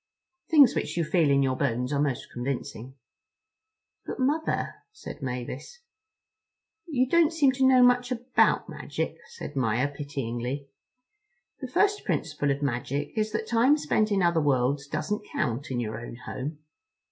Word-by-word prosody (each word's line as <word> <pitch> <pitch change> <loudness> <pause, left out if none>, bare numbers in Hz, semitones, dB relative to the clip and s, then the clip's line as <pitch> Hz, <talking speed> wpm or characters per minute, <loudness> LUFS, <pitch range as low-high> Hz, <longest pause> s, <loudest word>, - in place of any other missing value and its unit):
Things 290 -6 +7
which - - -3
you 170 - +2
feel 160 -1 +2
in 140 0 +4
your 130 -1 +1
bones 125 0 -1
are 140 - +1
most 140 -4 -2
convincing. 130 0 -5 1.1
"But - - -6
Mother," 295 +5 0 0.2
said 430 - -10
Mavis. 125 - -5 1.1
"You 260 -5 +1
don't 335 +2 +4
seem 295 -5 +4
to 260 0 +2
know 255 -1 +6
much 245 0 +4
about 245 +1 +2
magic," - - -4
said 465 - -9
Maia 125 0 +1
pityingly: 140 -1 -4 0.9
"the 260 - -5
first 410 +10 +2
principle 150 -4 -1
of 140 +1 -1
magic 140 +2 -2
is 215 0 0
that 220 0 -1
time 240 +6 +4
spent 215 -7 +1
in 195 -2 +2
other 170 -2 +3
worlds 140 0 +1
doesn't 185 +9 -3
count 125 +6 -2
in 125 -2 -2
your 110 -1 -3
own 120 - -8
home. 135 +5 -6
150 Hz, 150 wpm, -27 LUFS, -, 1.1 s, Things